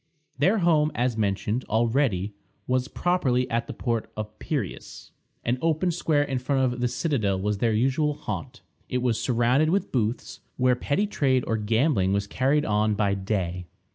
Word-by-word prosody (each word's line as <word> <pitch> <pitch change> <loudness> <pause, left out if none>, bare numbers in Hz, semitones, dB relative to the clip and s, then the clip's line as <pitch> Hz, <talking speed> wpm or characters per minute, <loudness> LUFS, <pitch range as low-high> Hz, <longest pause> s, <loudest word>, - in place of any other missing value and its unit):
Their 190 +10 +4
home, 160 -5 +3
as 120 0 0
mentioned 105 +3 -1
already, 110 -3 +1 0.3
was 130 0 0
properly 140 -8 +1
at 115 +1 0
the - - -5
port 115 -3 -2
of 110 0 -6
Piræus. 135 - -5 0.3
An 125 +2 0
open 165 +2 +1
square 155 -3 +1
in 135 -3 -2
front 130 -1 +1
of 125 - -7
the 125 - +1
citadel 115 - 0
was 105 +1 -1
their 115 0 +2
usual 135 +6 +1
haunt. 130 -2 -6 0.3
It 125 0 -1
was 120 -3 +1
surrounded 125 +5 +2
with 195 +4 0
booths, 115 -1 -2 0.2
where 125 0 +3
petty 145 +10 0
trade 135 -10 +1
or 115 - 0
gambling 110 - +1
was 100 0 0
carried 135 +8 +1
on 105 0 +1
by 100 -1 +1
day. 95 -3 -2
125 Hz, 170 wpm, -26 LUFS, 105-145 Hz, 0.3 s, Their